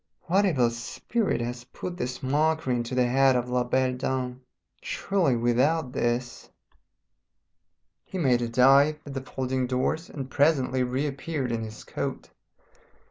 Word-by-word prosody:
What 190 Hz, +3 st, +2 dB
evil 125 Hz, -9 st, +2 dB
spirit 120 Hz, -, -2 dB
has 120 Hz, +1 st, -4 dB
put 175 Hz, +7 st, -7 dB
this 125 Hz, -2 st, -4 dB
mockery 150 Hz, 0 st, +1 dB
into 120 Hz, +1 st, -3 dB
the 125 Hz, -1 st, +3 dB
head 135 Hz, +1 st, +4 dB
of 125 Hz, 0 st, -1 dB
La 125 Hz, 0 st, +2 dB
Belle 130 Hz, +1 st, +1 dB
Dame? 125 Hz, 0 st, -3 dB, 0.4 s
Surely 185 Hz, -10 st, 0 dB
without 125 Hz, +4 st, +1 dB
this 120 Hz, +1 st, -2 dB, 0.8 s
" 85 Hz, +1 st, -54 dB
He 190 Hz, -, -6 dB
made 130 Hz, -8 st, +2 dB
a 120 Hz, -, -1 dB
dive 135 Hz, +5 st, +5 dB
at 140 Hz, -, -7 dB
the 135 Hz, -, -3 dB
folding 130 Hz, -1 st, -2 dB
doors 130 Hz, +6 st, -1 dB
and 135 Hz, -3 st, -6 dB
presently 135 Hz, -2 st, +2 dB
reappeared 135 Hz, +1 st, -2 dB
in 115 Hz, -1 st, -1 dB
his 110 Hz, -1 st, -8 dB
coat. -, -, -5 dB
130 Hz, 145 wpm, -26 LUFS, 120-145 Hz, 0.8 s, dive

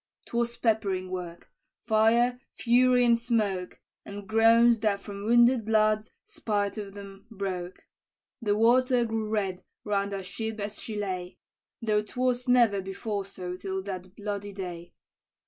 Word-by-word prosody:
"'Twas 235 Hz, 0 st, -2 dB
peppering 200 Hz, -5 st, 0 dB
work, 175 Hz, -2 st, -7 dB, 0.3 s
fire, 235 Hz, +2 st, +3 dB, 0.2 s
fury, 250 Hz, +1 st, +4 dB
and 235 Hz, -1 st, +4 dB
smoke, 210 Hz, -6 st, -1 dB, 0.2 s
And 200 Hz, 0 st, -9 dB
groans 230 Hz, +2 st, +5 dB
that 210 Hz, -2 st, +1 dB
from 200 Hz, 0 st, -8 dB
wounded 235 Hz, 0 st, +4 dB
lads, 215 Hz, 0 st, +2 dB
spite 205 Hz, -1 st, -2 dB
of 200 Hz, -1 st, -8 dB
'em, 195 Hz, +1 st, -11 dB
broke. 190 Hz, -4 st, -5 dB, 0.6 s
The 205 Hz, -2 st, +1 dB
water 245 Hz, +2 st, +4 dB
grew 220 Hz, -1 st, -2 dB
red 195 Hz, -4 st, -2 dB, 0.2 s
round 200 Hz, -1 st, -1 dB
our 195 Hz, -1 st, -4 dB
ship 220 Hz, +3 st, -5 dB
as 205 Hz, +1 st, -4 dB
she 220 Hz, -, -6 dB
lay, 185 Hz, -3 st, -4 dB, 0.5 s
Though 210 Hz, -2 st, +2 dB
'twas 250 Hz, +3 st, -1 dB
never 235 Hz, -5 st, +4 dB
before 195 Hz, +1 st, -4 dB
so 180 Hz, -2 st, -6 dB
till 190 Hz, 0 st, -4 dB
that 185 Hz, -1 st, -7 dB
bloody 205 Hz, -1 st, -5 dB
day. 175 Hz, -3 st, -7 dB
210 Hz, 140 wpm, -28 LUFS, 195-230 Hz, 0.6 s, groans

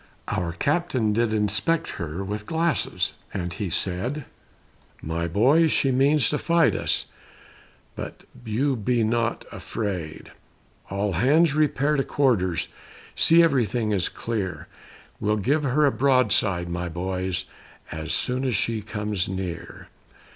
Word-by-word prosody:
Our 85 Hz, -2 st, -2 dB
captain 130 Hz, -, 0 dB
did 115 Hz, 0 st, +1 dB
inspect 105 Hz, +10 st, 0 dB
her 85 Hz, +4 st, -4 dB
With 105 Hz, +2 st, -5 dB
glasses, 165 Hz, -3 st, 0 dB, 0.2 s
and 90 Hz, -3 st, -3 dB
he 100 Hz, 0 st, -3 dB
said, 100 Hz, -, -3 dB, 0.7 s
"My 85 Hz, +2 st, -3 dB
boys, 140 Hz, -, +4 dB
she 135 Hz, -, +2 dB
means 135 Hz, 0 st, +4 dB
to 150 Hz, -, 0 dB
fight 170 Hz, 0 st, +3 dB
us, -, -, 0 dB, 0.9 s
But -, -, -7 dB, 0.2 s
be 110 Hz, -3 st, -6 dB
you 125 Hz, -2 st, +1 dB
not 115 Hz, +1 st, 0 dB
afraid; 90 Hz, -8 st, -5 dB, 0.6 s
All 100 Hz, +1 st, -1 dB
hands 145 Hz, -, +4 dB
repair 150 Hz, -1 st, +2 dB
to 135 Hz, -, +2 dB
quarters, 105 Hz, -, +1 dB, 0.5 s
See 170 Hz, +1 st, +6 dB
everything 120 Hz, -, +1 dB
is 95 Hz, -3 st, +1 dB
clear, 105 Hz, -6 st, -4 dB, 0.5 s
We'll 105 Hz, +1 st, +1 dB
give 140 Hz, +9 st, +1 dB
her 145 Hz, +2 st, +2 dB
a 140 Hz, -, +4 dB
broadside, 110 Hz, -10 st, +2 dB
my 85 Hz, +1 st, -3 dB
boys, 90 Hz, +1 st, -2 dB, 0.5 s
As 80 Hz, 0 st, -4 dB
soon 125 Hz, +1 st, +1 dB
as 130 Hz, -4 st, 0 dB
she 110 Hz, +2 st, 0 dB
comes 105 Hz, -3 st, -2 dB
near." 95 Hz, -3 st, -6 dB
110 Hz, 130 wpm, -25 LUFS, 95-135 Hz, 0.9 s, See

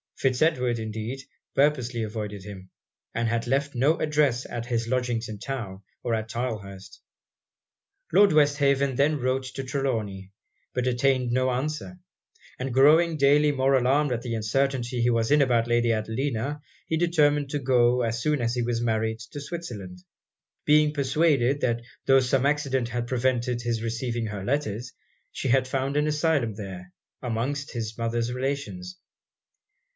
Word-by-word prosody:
Fitz 130 Hz, -2 st, 0 dB
Edward, 125 Hz, -7 st, +2 dB
indeed, 110 Hz, +3 st, -4 dB, 0.4 s
purposely 130 Hz, -5 st, +1 dB
avoided 105 Hz, -2 st, -5 dB
him, 95 Hz, -2 st, -10 dB, 0.4 s
and 115 Hz, 0 st, 0 dB
had 115 Hz, +1 st, -1 dB
left 140 Hz, +3 st, 0 dB
no 140 Hz, +6 st, +2 dB
address 145 Hz, -5 st, +1 dB
at 120 Hz, 0 st, -5 dB
his 115 Hz, -2 st, -1 dB
lodgings 120 Hz, -2 st, -1 dB
in 105 Hz, -, -6 dB
town, 105 Hz, -7 st, -5 dB, 0.2 s
or 120 Hz, -, -1 dB
at 110 Hz, 0 st, -2 dB
Tylehurst. 105 Hz, -6 st, -5 dB, 1.1 s
Lord 200 Hz, +2 st, +6 dB
Westhaven 140 Hz, -2 st, +3 dB
then 145 Hz, +3 st, +2 dB
wrote 130 Hz, +1 st, 0 dB
to 135 Hz, -, -3 dB
Trelawny, 110 Hz, -8 st, -3 dB, 0.4 s
but 125 Hz, -1 st, -1 dB
obtained 125 Hz, 0 st, +1 dB
no 130 Hz, +1 st, +2 dB
answer; 150 Hz, +8 st, -3 dB, 0.6 s
and 130 Hz, 0 st, -3 dB
growing 155 Hz, +5 st, +5 dB
daily 145 Hz, +1 st, +4 dB
more 135 Hz, -1 st, +2 dB
alarmed 135 Hz, +3 st, +2 dB
at 120 Hz, -1 st, -1 dB
the 120 Hz, -2 st, -3 dB
uncertainty 125 Hz, +2 st, 0 dB
he 120 Hz, -, +3 dB
was 115 Hz, 0 st, +1 dB
in 150 Hz, 0 st, +5 dB
about 120 Hz, -4 st, +2 dB
Lady 120 Hz, 0 st, +2 dB
Adelina, 115 Hz, +5 st, -2 dB, 0.3 s
he 160 Hz, -, 0 dB
determined 150 Hz, -4 st, +2 dB
to 145 Hz, -, -1 dB
go, 125 Hz, -2 st, +3 dB
as 115 Hz, 0 st, -1 dB
soon 150 Hz, 0 st, +1 dB
as 115 Hz, 0 st, 0 dB
he 120 Hz, -, 0 dB
was 120 Hz, 0 st, -1 dB
married, 110 Hz, -1 st, 0 dB
to 115 Hz, +5 st, -9 dB
Switzerland; 105 Hz, -, -7 dB, 0.6 s
being 150 Hz, 0 st, +4 dB
persuaded 140 Hz, -1 st, +2 dB
that 120 Hz, -1 st, 0 dB, 0.2 s
tho' 135 Hz, 0 st, +6 dB
some 130 Hz, +1 st, +1 dB
accident 140 Hz, -4 st, 0 dB
had 120 Hz, 0 st, -3 dB
prevented 125 Hz, -1 st, 0 dB
his 115 Hz, -2 st, -2 dB
receiving 115 Hz, 0 st, -2 dB
her 105 Hz, -2 st, -5 dB
letters, 120 Hz, -1 st, -2 dB, 0.4 s
she -, -, -4 dB
had 130 Hz, +1 st, +3 dB
found 135 Hz, +2 st, -1 dB
an 150 Hz, +1 st, +2 dB
asylum 150 Hz, -6 st, +1 dB
there, 95 Hz, -3 st, -8 dB, 0.3 s
amongst 130 Hz, +5 st, -2 dB
his 115 Hz, -2 st, -4 dB
mother's 115 Hz, 0 st, -1 dB
relations. 140 Hz, +8 st, -4 dB
125 Hz, 155 wpm, -26 LUFS, 115-140 Hz, 1.1 s, Lord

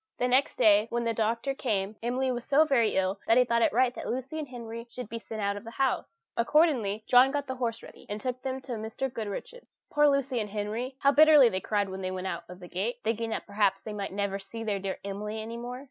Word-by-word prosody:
The 250 Hz, -, +1 dB
next 255 Hz, +3 st, +2 dB
day, 215 Hz, -2 st, +5 dB
when 235 Hz, 0 st, -1 dB
the 230 Hz, -1 st, 0 dB
doctor 230 Hz, +5 st, 0 dB
came, 210 Hz, -6 st, -2 dB
Emily 255 Hz, +3 st, 0 dB
was 245 Hz, -1 st, -3 dB
so 285 Hz, +4 st, +4 dB
very 240 Hz, -7 st, +2 dB
ill 190 Hz, +1 st, 0 dB
that 225 Hz, -, +5 dB
he 250 Hz, -, +6 dB
thought 235 Hz, -1 st, +1 dB
it -, -, +4 dB
right 245 Hz, +2 st, +3 dB
that -, -, -7 dB
Lucy 260 Hz, +5 st, -3 dB
and 300 Hz, -, -4 dB
Henry 230 Hz, -2 st, -8 dB
should 250 Hz, -1 st, -7 dB
be 230 Hz, +2 st, -5 dB
sent 220 Hz, -1 st, -7 dB
out 200 Hz, 0 st, 0 dB
of 205 Hz, -, -8 dB
the 230 Hz, -, -8 dB
house. 265 Hz, +2 st, 0 dB, 0.3 s
Accordingly, 235 Hz, -6 st, +2 dB
John 250 Hz, +1 st, +6 dB
got 285 Hz, 0 st, -2 dB
the 260 Hz, -1 st, -5 dB
horse 235 Hz, -2 st, -2 dB
ready, -, -, -14 dB
and 205 Hz, +1 st, -3 dB
took 255 Hz, +1 st, -3 dB
them 265 Hz, 0 st, -3 dB
to 260 Hz, -, -9 dB
Mrs. 225 Hz, +3 st, -4 dB
Goodriche's. 225 Hz, -, -6 dB, 0.2 s
Poor 295 Hz, 0 st, +5 dB
Lucy 275 Hz, -3 st, 0 dB
and 210 Hz, -2 st, -3 dB
Henry! 215 Hz, +5 st, -3 dB
How 280 Hz, -, +5 dB
bitterly 300 Hz, -3 st, +7 dB
they 185 Hz, -3 st, -2 dB
cried 205 Hz, -2 st, 0 dB
when 190 Hz, 0 st, -6 dB
they 185 Hz, -, -2 dB
went 185 Hz, 0 st, -4 dB
out 190 Hz, -, -4 dB
of 180 Hz, 0 st, -10 dB
the 180 Hz, -, -10 dB
gate, 200 Hz, +8 st, -2 dB
thinking 225 Hz, +1 st, -1 dB
that -, -, -3 dB
perhaps 200 Hz, -1 st, +1 dB
they 215 Hz, -, -6 dB
might 200 Hz, -1 st, -4 dB
never 200 Hz, 0 st, -2 dB
see 225 Hz, +4 st, -8 dB
their 210 Hz, -3 st, -1 dB
dear 190 Hz, 0 st, -3 dB
Emily 210 Hz, +2 st, -4 dB
any 225 Hz, +2 st, -6 dB
more! 245 Hz, +2 st, -6 dB
230 Hz, 255 wpm, -28 LUFS, 205-255 Hz, 0.3 s, bitterly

